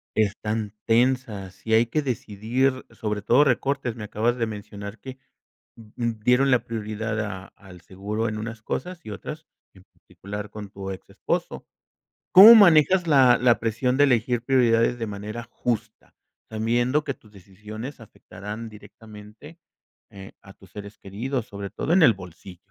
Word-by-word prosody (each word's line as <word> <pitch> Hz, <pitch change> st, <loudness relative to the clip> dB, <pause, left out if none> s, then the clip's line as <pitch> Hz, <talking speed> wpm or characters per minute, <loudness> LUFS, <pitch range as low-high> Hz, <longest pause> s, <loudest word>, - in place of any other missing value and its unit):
están 105 Hz, 0 st, -1 dB
tensas, 115 Hz, -6 st, 0 dB
y 110 Hz, -, +1 dB
hay 115 Hz, +1 st, +4 dB
que 150 Hz, +6 st, -1 dB
decidir, 125 Hz, +1 st, -2 dB
sobre 105 Hz, -2 st, -4 dB
todo 120 Hz, +7 st, +4 dB
recortes. 135 Hz, -2 st, -1 dB
Me 115 Hz, -, -8 dB
acabas 115 Hz, +4 st, -1 dB
de 115 Hz, -, 0 dB
mencionar 105 Hz, 0 st, -8 dB
que 130 Hz, 0 st, -10 dB, 0.6 s
d 110 Hz, -2 st, -16 dB
d 115 Hz, -2 st, -2 dB
dieron 125 Hz, +3 st, +3 dB
la 125 Hz, -2 st, +2 dB
prioridad 110 Hz, -1 st, -4 dB
a 95 Hz, -3 st, -5 dB
al 95 Hz, -3 st, -15 dB
seguro 100 Hz, +6 st, -4 dB
en 110 Hz, 0 st, -4 dB
unas 110 Hz, 0 st, -7 dB
cosas 180 Hz, +10 st, -5 dB
y -, -, -8 dB
otras, 150 Hz, +10 st, -8 dB, 0.3 s
en 95 Hz, -, -18 dB
particular 105 Hz, +1 st, -9 dB
con 105 Hz, -2 st, -9 dB
tu 95 Hz, 0 st, -7 dB
exesposo, 95 Hz, -, -5 dB, 0.7 s
¿cómo 210 Hz, +5 st, +11 dB
manejas 180 Hz, -2 st, +5 dB
la 130 Hz, -5 st, +5 dB
la 120 Hz, -1 st, +3 dB
presión 115 Hz, +3 st, -1 dB
de 145 Hz, -, +6 dB
elegir 120 Hz, -2 st, +1 dB
prioridades 120 Hz, -2 st, +2 dB
de 115 Hz, -, -3 dB
manera 105 Hz, +3 st, -6 dB
justa, 115 Hz, -2 st, -4 dB, 0.4 s
sabiendo 120 Hz, +6 st, 0 dB
que 140 Hz, -, -3 dB
tus 110 Hz, -4 st, -23 dB
decisiones 105 Hz, +7 st, -10 dB
afectarán 110 Hz, 0 st, -9 dB
directamente, 105 Hz, +7 st, -14 dB, 0.5 s
eh, 95 Hz, -1 st, -12 dB
a 95 Hz, -, -14 dB
tus 95 Hz, -, -20 dB
seres 100 Hz, 0 st, -10 dB
queridos, 115 Hz, +5 st, -4 dB
sobre 100 Hz, -1 st, -7 dB
todo 160 Hz, -, -2 dB
en 185 Hz, -1 st, +5 dB
el 120 Hz, -, +6 dB
bolsillo? 90 Hz, -1 st, -12 dB
110 Hz, 155 wpm, -24 LUFS, 105-125 Hz, 0.7 s, cómo